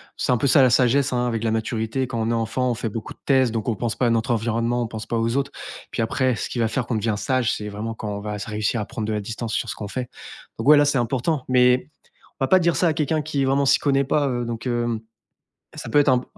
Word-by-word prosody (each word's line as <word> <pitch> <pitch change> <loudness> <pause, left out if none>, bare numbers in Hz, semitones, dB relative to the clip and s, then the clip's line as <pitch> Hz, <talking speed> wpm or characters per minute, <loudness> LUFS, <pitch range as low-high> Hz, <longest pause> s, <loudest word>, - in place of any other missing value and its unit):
c'est 125 - +1
peu 140 - +1
ça, 140 +2 +6
la 130 - +6
sagesse, 125 +3 +3
hein, 125 -1 0
avec 115 -2 -2
la 115 - +1
maturité. 115 +3 -1
Quand 115 -3 -3
on 110 - 0
est - - +1
enfant, 115 +3 0
on - - -1
fait 115 -1 -3
beaucoup 110 +1 -6
de - - -35
tests, 130 -3 +3
donc 110 -2 -3
on 115 - +1
pense 115 +2 -2
pas 125 - +2
à - - +3
notre 115 +2 +1
environnement, 115 +1 0
on - - -3
pense 110 -1 -7
pas 115 - -2
aux 115 +1 0
autres. 140 0 -1 0.4
Puis - - -2
après, 130 +2 +1
ce - - -3
qui 120 - -5
va 115 -1 +2
faire 125 +2 -2
qu'on 120 - -1
devient 110 0 0
sage, 130 0 0
c'est 105 - -5
vraiment 105 +2 -5
quand 110 -1 -6
on - - -6
va 105 0 -4
s 105 - -5
réussir 110 +1 -1
à 105 - -2
prendre 110 - -5
de 110 - -2
la 105 - -1
distance 110 +2 -5
sur - - -1
ce - - -4
qu'on 105 - -6
fait. 125 +2 -4 0.5
Donc - - -4
ouais 150 - +9
là, 145 - +5
c'est 145 -1 +1
important. 130 +4 0
Mais 125 +1 +4 0.5
on - - +2
va - - 0
pas 185 - +6
dire 170 -2 +2
ça 175 - +2
à - - +2
quelqu'un 155 +1 0
qui 145 -2 -1
vraiment 135 +1 +2
s'y - - +5
connaît 140 -1 +2
pas, 145 +2 +1
heu, 120 -2 -2
donc, 115 +1 -5
hem, 120 -2 0 0.8
ça - - -7
peut 145 - +4
être 145 - +4
un 130 - +5
b 125 - -3
120 Hz, 295 wpm, -23 LUFS, 115-135 Hz, 0.8 s, ouais